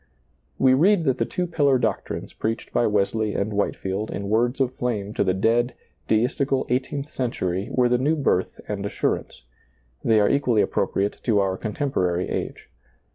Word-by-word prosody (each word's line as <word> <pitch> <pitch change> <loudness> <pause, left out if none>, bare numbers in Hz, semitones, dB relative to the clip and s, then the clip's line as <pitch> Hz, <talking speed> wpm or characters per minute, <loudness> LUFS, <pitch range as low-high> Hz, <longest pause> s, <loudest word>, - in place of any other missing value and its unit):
We 130 -1 +5
read 175 +6 +4
that 130 -4 +1
the - - +1
two 180 - -2
pillar 145 -6 +2
doctrines - - -3
preached 115 +1 -3
by 120 - +3
Wesley 105 +1 0
and 100 +2 -1
Whiteiield 100 0 -2
in 100 0 -4
words 120 +5 +1
of 130 -2 +1
flame 105 -5 -3
to - - +1
the 95 -2 +1
dead, 120 +5 +1 0.3
deistical 130 +4 +1
eighteenth 135 +4 -2
century 95 -7 -2
were 125 -1 +3
the 120 0 +2
new 150 +5 +2
birth 135 - 0
and 100 -1 -3
assurance; 100 -10 -2 0.6
they 110 -2 +4
are 105 - +4
equally 125 -6 +2
appropriate 100 +1 -1
to 110 -4 +2
our 95 -1 +1
contemporary 95 -5 -1
age. - - -4
115 Hz, 165 wpm, -24 LUFS, 100-130 Hz, 0.6 s, We